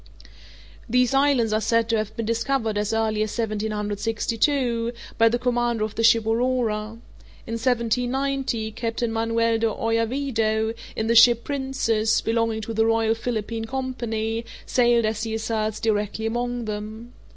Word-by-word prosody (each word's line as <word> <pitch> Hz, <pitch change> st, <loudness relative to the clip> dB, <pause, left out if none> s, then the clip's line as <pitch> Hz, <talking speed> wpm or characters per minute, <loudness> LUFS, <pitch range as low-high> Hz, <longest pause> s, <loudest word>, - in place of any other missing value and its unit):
These 250 Hz, +2 st, +3 dB
islands 270 Hz, -5 st, +3 dB
are 215 Hz, -, +1 dB
said 230 Hz, 0 st, +2 dB
to 225 Hz, -, +2 dB
have 215 Hz, 0 st, -4 dB
been 230 Hz, -, -2 dB
discovered 230 Hz, 0 st, 0 dB
as 210 Hz, +1 st, -1 dB
early 220 Hz, -1 st, 0 dB
as 215 Hz, +1 st, -2 dB
1762, 225 Hz, +3 st, -1 dB, 0.3 s
by 230 Hz, 0 st, +6 dB
the 240 Hz, -, +1 dB
commander 240 Hz, -2 st, 0 dB
of 215 Hz, -1 st, -3 dB
the 225 Hz, -, -2 dB
ship 230 Hz, -1 st, +5 dB
Aurora. 225 Hz, -2 st, 0 dB, 0.5 s
In 230 Hz, -, -6 dB
1790, 245 Hz, 0 st, 0 dB
Captain 230 Hz, +1 st, -2 dB
Manuel 230 Hz, 0 st, +1 dB
de 225 Hz, -, +2 dB
Oyarvido, 225 Hz, 0 st, 0 dB, 0.2 s
in 220 Hz, -, -1 dB
the 230 Hz, -, +2 dB
ship 235 Hz, 0 st, +7 dB
Princess, 265 Hz, -6 st, 0 dB
belonging 225 Hz, -1 st, 0 dB
to 225 Hz, +1 st, -5 dB
the 225 Hz, 0 st, +2 dB
Royal 225 Hz, 0 st, +2 dB
Philippine 225 Hz, -1 st, -3 dB
Company, 230 Hz, -3 st, -3 dB, 0.2 s
sailed, 240 Hz, -2 st, +3 dB
as 215 Hz, 0 st, -1 dB
he 220 Hz, -1 st, -2 dB
asserts, 220 Hz, -1 st, -2 dB
directly 215 Hz, 0 st, -1 dB
among 240 Hz, +1 st, -2 dB
them. 215 Hz, +3 st, -6 dB
225 Hz, 145 wpm, -24 LUFS, 220-240 Hz, 0.5 s, ship